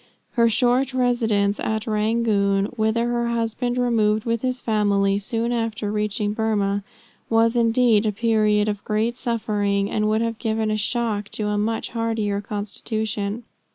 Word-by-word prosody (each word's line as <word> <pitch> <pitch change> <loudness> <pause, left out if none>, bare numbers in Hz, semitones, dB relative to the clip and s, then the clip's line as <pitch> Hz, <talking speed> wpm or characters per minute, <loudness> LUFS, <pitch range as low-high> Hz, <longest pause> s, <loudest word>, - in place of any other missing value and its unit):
Her 235 -2 +3
short 255 +3 +1
residence 225 -5 +1
at 220 -1 -2
Rangoon, 210 -2 +1
whither 225 +1 +1
her 240 0 0
husband 235 +1 -1
removed 220 -3 +1
with 230 -1 0
his 255 -1 -1
family 200 -3 +1
soon 230 +3 -2
after 225 -3 -2
reaching 210 0 -1
Burmah, 205 -2 0 0.5
was 225 +1 +3
indeed 230 -2 +3
a - - +2
period 215 -1 +2
of 205 -1 -3
great 220 +3 0
suffering, 205 -4 -1
and 215 0 +1
would 220 +1 +1
have 230 -1 -2
given 220 -2 -1
a - - +1
shock 215 -1 -1
to 210 -1 -2
a 210 - 0
much 220 +2 -1
hardier 225 -3 -1
constitution. 210 +1 -3
220 Hz, 150 wpm, -23 LUFS, 210-230 Hz, 0.5 s, Her